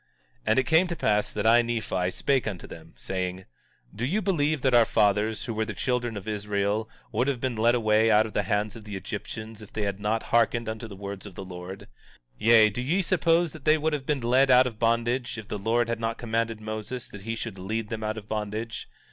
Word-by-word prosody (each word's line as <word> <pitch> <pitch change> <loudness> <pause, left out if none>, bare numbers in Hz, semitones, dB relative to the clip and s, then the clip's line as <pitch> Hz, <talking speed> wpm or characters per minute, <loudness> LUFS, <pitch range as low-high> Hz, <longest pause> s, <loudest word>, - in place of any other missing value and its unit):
17:23 - - -38
And 110 - +3
it 130 - +4
came 160 +6 +4
to 170 - -3
pass 105 -8 +1
that 105 - -3
I, 115 +2 +7
Nephi, 110 -6 -1
spake 135 +5 0
unto 95 -5 -5
them, 80 0 -12
saying: 95 0 -3 0.5
Do 110 - -5
ye 170 +12 +1
believe 155 -8 +1
that 130 -2 +3
our 120 -1 +7
fathers, 105 +1 +1
who 120 - -3
were 110 0 0
the 105 -2 -5
children 120 -2 -1
of 100 +1 -8
Israel, 105 +1 -1 0.2
would 125 - +1
have 135 -3 0
been 130 -1 -2
led 115 +2 +3
away 110 -1 +3
out 110 0 +5
of 110 - -7
the - - +2
hands 105 +3 -1
of 115 - -10
the 105 -1 -7
Egyptians 110 +3 -6
if 105 - -12
they 110 - -3
had 100 -1 -2
not 110 +2 0
hearkened 115 0 +3
unto 110 +1 -4
the 100 - -9
words 100 +1 -7
of 95 - -12
the 95 - -7
Lord? 90 +1 -8
17:24 - - -14 0.5
Yea, 110 -1 +6
do 120 - -4
ye 165 +10 +1
suppose 170 -2 +2
that 155 -4 -12
they 155 +1 +5
would 155 +1 0
have 140 -3 -3
been 145 -3 0
led 130 +3 +3
out 130 0 +7
of 115 -4 -5
bondage, 120 +2 +1
if 110 -3 -8
the 105 - -4
Lord 115 +3 +1
had 115 -1 -2
not 115 0 -2
commanded 115 -1 -1
Moses 110 +3 -5
that 105 - -10
he 115 +3 -3
should 115 -4 -6
lead 105 +3 -3
them 110 -1 -4
out 110 0 -2
of 105 -1 -8
bondage? 110 +2 -4
110 Hz, 240 wpm, -27 LUFS, 105-120 Hz, 0.5 s, I